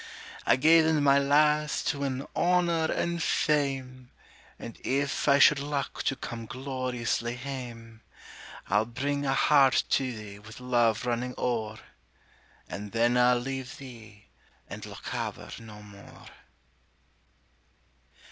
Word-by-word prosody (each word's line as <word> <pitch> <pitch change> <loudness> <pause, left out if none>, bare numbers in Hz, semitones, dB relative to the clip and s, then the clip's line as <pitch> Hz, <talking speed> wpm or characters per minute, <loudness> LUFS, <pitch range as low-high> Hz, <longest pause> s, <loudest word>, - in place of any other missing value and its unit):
I - - +6
gae 160 +5 +6
then, 160 -2 +2
my 140 0 +5
lass, 150 +2 +2
to 140 - -1
win 135 -1 -3
honor 170 -2 +2
and 170 0 -1
fame, 135 -5 -1 0.5
And 115 - -9
if 140 +2 -1
I 140 -1 +6
should 145 +1 +6
luck 140 -1 -3
to 135 - +1
come 115 -3 -7
gloriously 125 -2 -3
hame, 120 -4 -8 0.7
I'll 105 +3 +2
bring 140 +4 -2
a 135 - +2
heart 140 -3 +4
to 130 -2 +1
thee 105 -3 -9
with 110 +3 -12
love 120 -3 +1
running 125 +1 -2
o'er, 110 -3 -2 0.9
And 105 +1 -7
then 120 +1 +2
I'll 125 0 +4
leave 135 +2 -5
thee 110 -6 -12 0.4
and - - -8
Lochaber - - -6
no 105 -2 -12
more. 100 -1 -14
130 Hz, 125 wpm, -28 LUFS, 115-140 Hz, 0.9 s, I